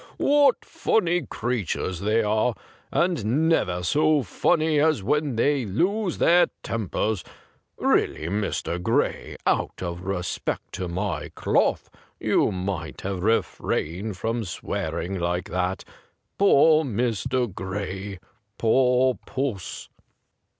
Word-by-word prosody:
What 285 -2 +3
funny 175 - +1
creatures 105 -6 -2
they 105 +3 +2
are, 110 +3 +1 0.4
and 160 - +1
never 90 - +1
so 150 - +3
funny 155 - +2
as 155 -8 +2
when 150 +3 0
they 140 +3 +2
lose 180 - 0
their 175 +1 +5 0.2
tempers! 110 -2 -2 0.5
Really, - - +1
Mr. 95 -2 -2
Gray, - - 0
out - - 0
of 85 -1 -4
respect 90 -1 -3
to 90 0 -3
my 85 -2 -3
cloth, - - +1 0.3
you - - +2
might 90 -3 -4
have 95 -2 -3
refrained 100 -2 -1
from 115 +4 -1
swearing 95 0 -3
like 90 +1 -2
that. 90 +1 -1 0.6
Poor 160 -5 +6
Mr. 125 - -1
Gray! 95 +1 -5 0.4
Poor 125 +2 +3
puss 125 -9 -3
110 Hz, 110 wpm, -25 LUFS, 95-145 Hz, 0.6 s, Poor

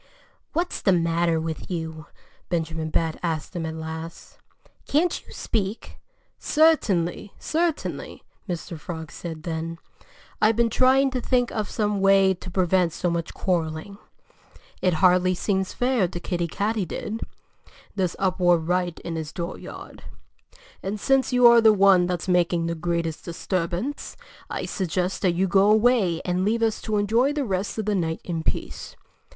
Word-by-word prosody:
"What's 345 +3 -1
the 195 - +4
matter 170 -1 +1
with 160 0 -5
you?" 160 -3 -5 0.4
Benjamin 160 -2 -2
Bat 160 0 -1
asked 160 -2 -3
him 165 -2 -2
at 160 - -5
last. 160 +1 -8 0.5
"Can't 330 +4 +1
you - - -17
speak?" 210 -1 -3 0.4
"Certainly! 205 - +2
Certainly!" 325 -1 -2 0.3
Mr. 170 -1 -5
Frog 160 -1 -7
said 160 -3 -7
then. 165 0 -4 0.6
"I've 215 +1 +4
been 235 0 +2
trying 265 +3 +4
to 255 -1 -2
think 245 0 +1
of 215 -3 -3
some 210 -2 -1
way 195 -1 +5
to 185 0 -9
prevent 180 -2 +2
so 175 +1 -1
much 170 -1 -3
quarreling. 175 +2 -2 0.8
It 180 -3 +2
hardly 185 0 +4
seems 190 0 -1
fair 245 -6 +1
to 175 0 -6
Kiddie 175 -1 -2
Katydid 210 +3 -3 0.7
this 185 -3 -1
uproar 180 -2 +3
right 175 +1 -1
in 170 -1 -5
his 155 -1 -5
dooryard. 170 +1 -7 0.8
And 200 +2 -4
since 270 +4 +2
you 250 -1 +4
are 235 -1 +8
the 220 -1 +7
one 195 -3 +5
that's 180 -1 -3
making 175 -2 +2
the 170 - -1
greatest 170 -1 -2
disturbance, 180 +8 -3 0.3
I'd - - -3
suggest 180 0 -2
that 185 -3 +2
you 185 +3 +1
go 195 +2 +4
away 215 -6 +3
and 180 +1 0
leave 225 +3 +1
us 225 -1 0
to 215 -1 -1
enjoy 230 +7 +2
the 290 -2 -1
rest 195 0 -2
of 215 - -2
the 210 - +1
night 165 -4 -1
in 165 -2 -3
peace." - - -4
185 Hz, 155 wpm, -24 LUFS, 170-215 Hz, 0.8 s, are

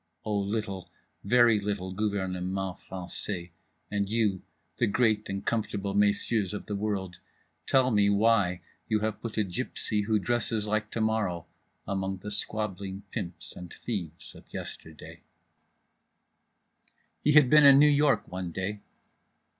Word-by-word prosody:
O 105 - -1
little, 100 -1 -2 0.3
very 115 0 +5
little, 100 -2 -3
gouvernement 95 -3 -2 0.2
français, 90 -1 -5 0.4
and 100 -1 0
you, 105 -4 +1 0.4
the 115 - +2
great 110 0 +2
and 100 0 -4
comfortable 100 -3 -1
messieurs 100 0 +2
of - - -6
the 105 - -3
world, 100 -3 -3 0.5
tell 130 -1 +4
me 105 -2 +4
why 100 -4 +3 0.3
you 110 -2 +2
have 110 -1 -2
put 115 -2 -6
a 110 - +3
gypsy 105 +1 -2
who 110 0 +2
dresses 115 0 -1
like 105 0 -1
To 115 - -3
morrow 110 -6 0 0.4
among 95 0 -2
the 105 +3 -7
squabbling 100 -3 -2
pimps 90 -7 -6
and 90 -1 -9
thieves 90 -9 -5
of - - -16
yesterday…. - - -8 2.0
He 150 - +3
had 150 -3 +7
been 150 +3 +7
in 140 -1 +9
New 145 - +7
York 140 -7 +3
one 90 -1 -5
day. 95 +4 -4
105 Hz, 140 wpm, -28 LUFS, 95-110 Hz, 2.0 s, in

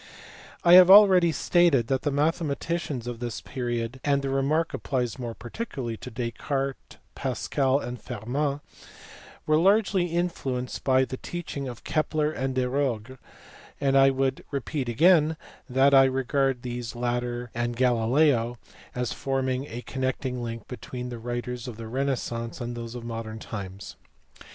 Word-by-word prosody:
I 175 - +6
have 185 0 +10
already 190 -4 +8
stated 165 -7 +3
that 130 +2 0
the 145 - 0
mathematicians 150 -2 -1
of 120 -1 -5
this 120 -2 -4
period 120 -1 -4
and 140 -1 +1
the 135 - -1
remark 145 +5 +1
applies 125 -2 -2
more 120 -2 -5
particularly 120 - -5
to 125 - -8
Descartes, 130 +3 -4 0.2
Pascal, 135 +1 0
and 125 -5 -5
Fermat 140 +7 -2 0.8
were 155 0 +3
largely 195 0 +3
influenced 160 -8 -2
by 130 -1 +3
the 130 - -6
teaching 155 -5 -5
of 120 -2 -8
Kepler 155 -1 0
and 135 -3 -3
Desargues, 130 -2 -1 0.6
and 135 -1 +1
I 135 0 +7
would 135 0 -1
repeat 140 -1 -3
again 160 +4 +4 0.3
that 135 +2 +4
I 135 -1 +8
regard 135 0 0
these 120 -1 -5
latter 120 0 -2
and 120 0 -2
Galileo 120 0 +2 0.4
as 125 -1 -2
forming 135 0 -2
a 120 -1 -7
connecting 130 -1 -3
link 115 -2 -6
between 125 0 -6
the 120 -1 -6
writers 120 +1 -4
of 120 -3 -7
the 115 - -7
renaissance 120 -2 -3
and 120 0 -4
those 115 0 -6
of 120 - -6
modern 115 -1 -5
times. 100 -3 -7
130 Hz, 145 wpm, -26 LUFS, 120-145 Hz, 0.8 s, have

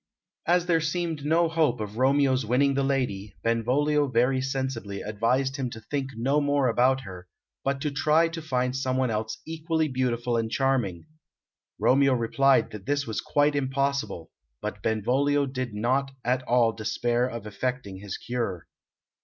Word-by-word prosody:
As 175 +1 +3
there 165 -2 +2
seemed 160 -2 -2
no 165 +3 +3
hope 160 -6 +1
of 105 +1 -5
Romeo's 135 0 +3
winning 130 +5 +2
the 140 - +1
lady, 115 -8 -1
Benvolio 140 +6 +2
very 130 +1 +2
sensibly 130 -7 -3
advised 125 +6 0
him 130 -3 -2
to 110 - -8
think 135 +4 -3
no 135 +6 +1
more 145 -2 +2
about 130 +3 +3
her, 90 -6 -10 0.4
but 135 0 0
to 150 - -1
try 155 +4 +3
to 165 0 -6
find 125 -4 -1
someone 130 -1 0
else 110 +1 -2
equally 160 0 -1
beautiful 125 -3 -1
and 115 -1 -1
charming. 120 -10 0 0.7
Romeo 135 +1 +4
replied 130 +2 +2
that 105 -3 -9
this 145 0 0
was 110 - -3
quite 145 0 +2
impossible, 135 - -1 0.3
but - - -5
Benvolio 135 +7 +1
did 130 -4 -4
not 130 +6 +1 0.2
at 125 +1 +1
all 120 -2 +4
despair 120 +2 0
of 115 -4 -6
effecting 105 -1 -4
his 100 0 -6
cure. 115 -8 -3
130 Hz, 155 wpm, -26 LUFS, 115-140 Hz, 0.7 s, Romeo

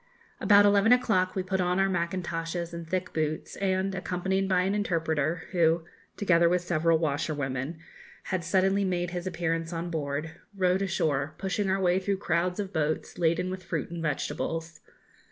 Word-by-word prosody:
About 205 -1 +6
eleven 205 +2 +5
o'clock 220 -7 +3
we 190 - 0
put 190 0 -1
on 180 +1 +1
our 195 - +4
mackintoshes 170 -1 -2
and 170 -1 -7
thick 185 0 -2
boots, 155 -1 -2
and, 190 0 0
accompanied 190 +1 -1
by 185 -1 +3
an 190 +2 0
interpreter, 165 -5 0
who 165 -2 +2 0.3
(together 170 -4 +4
with 180 0 +1
several 165 -1 +2
washerwomen) 145 -1 -2 0.5
had 185 -2 -2
suddenly 190 +2 +2
made 175 -2 -1
his 175 0 -4
appearance 165 -2 -2
on 170 0 -4
board, 150 0 -3 0.3
rowed 185 0 +2
ashore, 155 -6 0
pushing 195 +1 -1
our 190 +1 +1
way 180 0 +3
through 195 +1 -1
crowds 180 0 0
of 200 -1 -4
boats 155 +2 -2
laden 170 +2 +1
with 185 0 -5
fruit 170 -3 -4
and 170 -1 -5
vegetables. 165 +2 -3
175 Hz, 165 wpm, -28 LUFS, 165-190 Hz, 0.5 s, About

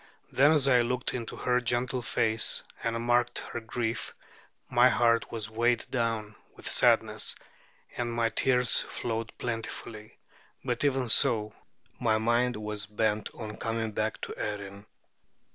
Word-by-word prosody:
Then 145 +3 +5
as 145 -3 +2
I 125 -3 +5
looked 125 +1 -1
into 120 -3 -5
her 125 0 +1
gentle 125 +1 0
face 115 -1 +1 0.2
and 115 0 -1
marked 120 0 +2
her - - -4
grief, 115 0 -3 0.5
my 125 +1 +5
heart 115 -2 +2
was 110 -2 -4
weighed 120 +1 +1
down 115 -4 -1 0.2
with - - -12
sadness, - - +3 0.6
and 120 -1 -2
my 115 -1 +1
tears 125 0 +3
flowed 115 -1 -4
plentifully; 115 -2 -6 0.5
but - - -1
even 135 -3 +1
so, 110 -3 +3 0.5
my 110 -3 +2
mind 120 +2 +2
was 105 -1 -4
bent 105 0 0
on 105 -2 -7
coming 115 -1 -2
back 110 +1 -2
to - - -5
Erin. 100 -1 -5
115 Hz, 140 wpm, -29 LUFS, 110-125 Hz, 0.6 s, Then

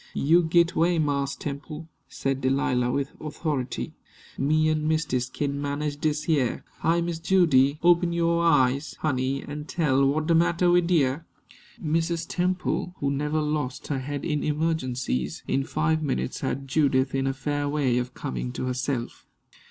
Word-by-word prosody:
"You 165 +5 +4
git 170 +1 +3
'way, 170 +1 +3
Marse 140 -3 0
Temple," 150 +2 -6 0.2
said 135 0 -2
Delilah, 130 -2 +1
with 140 +2 -1
authority. 150 -4 -3 0.4
"Me 155 +3 +2
an' 155 -1 0
mistis 150 -6 0
kin 140 0 -2
manage 145 +1 -2
dis 150 0 -1
heah. 140 -7 0 0.2
Hi, 170 +1 +2
Miss 170 -1 -3
Judy! 150 -7 +3
Open 175 0 +4
yo' 170 0 +1
eyes, 140 -4 +2
honey, 135 -2 0
an' 150 +1 -6
tell 145 -5 +1
what 155 +3 0
de 165 - +2
matter 170 +1 +3
wid 175 -1 +3
you." 145 -4 +2 0.6
Mrs. 165 +1 -1
Temple, 180 0 -1
who 140 -1 -1
never 150 +2 0
lost 150 -3 -3
her 140 -3 -1
head 145 +2 -4
in 150 -3 -1
emergencies, 135 - -1
in 135 - +1
five 155 +2 0
minutes 135 -3 -2
had 135 0 -3
Judith 135 -2 +2
in 135 0 0
a - - +2
fair 145 +1 -2
way 135 -4 +1
of 125 0 -5
coming 60 -1 -4
to - - -3
herself. 125 -1 -3
150 Hz, 160 wpm, -26 LUFS, 135-160 Hz, 0.6 s, You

